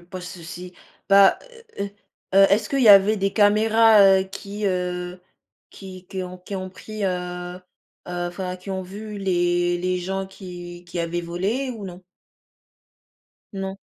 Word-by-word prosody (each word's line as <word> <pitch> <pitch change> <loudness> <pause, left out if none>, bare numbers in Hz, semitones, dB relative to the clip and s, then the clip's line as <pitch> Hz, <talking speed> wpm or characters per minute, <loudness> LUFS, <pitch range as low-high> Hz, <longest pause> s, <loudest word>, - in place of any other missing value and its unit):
pas 180 +1 -9
ceci, 180 0 -9 0.4
bah, 195 -1 +6 0.4
heu 200 - -1 0.5
heu, 195 0 +8
est-ce 210 +2 +2
qu'il 275 -2 0
y 225 - +6
avait 200 +1 +7
des 195 0 -1
caméras, 220 +1 +5 0.2
heu, 190 - 0
qui 200 +2 -6
heu, 180 -1 -2 0.5
qui 185 -2 -11
qui 190 -1 -4
ont 180 0 -9
qui 190 +2 -7
ont 185 0 -5
pris, 210 +2 -6
heu - - +2
heu, 180 0 -5 0.5
enfin, 180 +1 -4
qui 185 +2 -10
ont 190 0 -3
vu 210 +3 -8
les 175 -2 +1
les 180 0 -1
gens 190 +2 -3
qui 175 -2 -10
qui 175 0 -6
avaient 170 +1 -2
volé 195 +10 -2
ou 220 -4 -7
non? 180 0 -9 1.5
Non. 195 0 -4
185 Hz, 155 wpm, -23 LUFS, 180-200 Hz, 1.5 s, heu